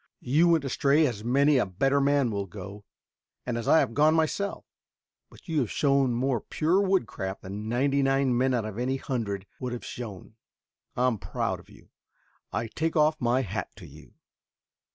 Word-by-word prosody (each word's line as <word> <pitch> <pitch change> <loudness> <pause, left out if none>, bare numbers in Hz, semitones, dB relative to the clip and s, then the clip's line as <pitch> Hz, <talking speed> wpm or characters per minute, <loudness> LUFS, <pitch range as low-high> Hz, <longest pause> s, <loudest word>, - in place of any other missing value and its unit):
You 155 +7 +3
went 165 -4 +3
astray 140 +3 +3
as 115 -6 -3
many 140 +4 +3
a - - +2
better 135 +10 +1
man 140 -3 +2
will 100 -1 -3
go, 100 +2 -9 0.6
as 120 -2 -3
I - - +6
have - - -2
gone 155 +4 +4
myself, 165 +5 -1 0.6
but - - -18
you 160 -3 0
have 120 -6 0
shown 140 -4 +2
more 125 -2 0
pure 170 +5 +1
woodcraft 115 - -1
than 105 +3 -6
ninety 135 +4 +1
nine 135 -2 +2
men 130 +1 +2
out 115 -3 -1
of 110 +1 -6
any 130 +2 0
hundred 105 -8 -3
would 125 -1 -4
have 120 - -6
shown. 110 -2 -8 0.6
I 125 - +1
am 120 -5 +1
proud - - -3
of - - -18
you. - - -18 0.6
I 110 +4 -2
take 160 +9 -2
off 155 -1 +3
my 125 +2 +2
hat 100 - -5
to - - -12
you." - - -15
130 Hz, 180 wpm, -27 LUFS, 110-145 Hz, 0.6 s, I